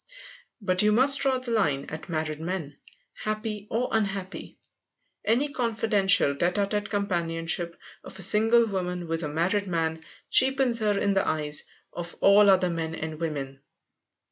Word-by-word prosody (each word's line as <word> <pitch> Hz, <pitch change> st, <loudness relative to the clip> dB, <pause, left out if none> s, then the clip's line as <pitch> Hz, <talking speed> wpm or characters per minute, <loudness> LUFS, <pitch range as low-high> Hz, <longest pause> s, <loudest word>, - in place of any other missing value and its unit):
But 185 Hz, -4 st, +1 dB
you 210 Hz, 0 st, +3 dB
must 265 Hz, +5 st, +6 dB
draw 265 Hz, -1 st, +1 dB
the 255 Hz, -2 st, -5 dB
line 150 Hz, -12 st, 0 dB
at 155 Hz, +3 st, -9 dB
married 155 Hz, -2 st, -3 dB
men, 165 Hz, -4 st, -5 dB, 0.4 s
happy 215 Hz, -1 st, -5 dB
or 245 Hz, +3 st, -1 dB
unhappy. 195 Hz, -3 st, -3 dB, 0.7 s
Any 255 Hz, +7 st, +1 dB
confidential, 210 Hz, -, +2 dB
tête 175 Hz, +5 st, -1 dB
à 200 Hz, -1 st, +1 dB
tête 205 Hz, 0 st, -3 dB
companionship 170 Hz, -4 st, -1 dB, 0.3 s
of -, -, -11 dB
a 195 Hz, -, +1 dB
single 225 Hz, +5 st, +4 dB
woman 180 Hz, -4 st, -4 dB
with 165 Hz, 0 st, -2 dB
a 155 Hz, -, -3 dB
married 180 Hz, +7 st, -1 dB
man 160 Hz, -2 st, -2 dB, 0.3 s
cheapens 260 Hz, -2 st, +4 dB
her 210 Hz, -2 st, 0 dB
in 200 Hz, 0 st, +1 dB
the 195 Hz, -, 0 dB
eyes 150 Hz, -1 st, +2 dB, 0.3 s
of 175 Hz, 0 st, -7 dB
all 200 Hz, +1 st, +5 dB
other 185 Hz, -2 st, +3 dB
men 165 Hz, -1 st, -4 dB
and 160 Hz, -1 st, -6 dB
women. 140 Hz, -4 st, -5 dB
190 Hz, 155 wpm, -26 LUFS, 165-215 Hz, 0.7 s, must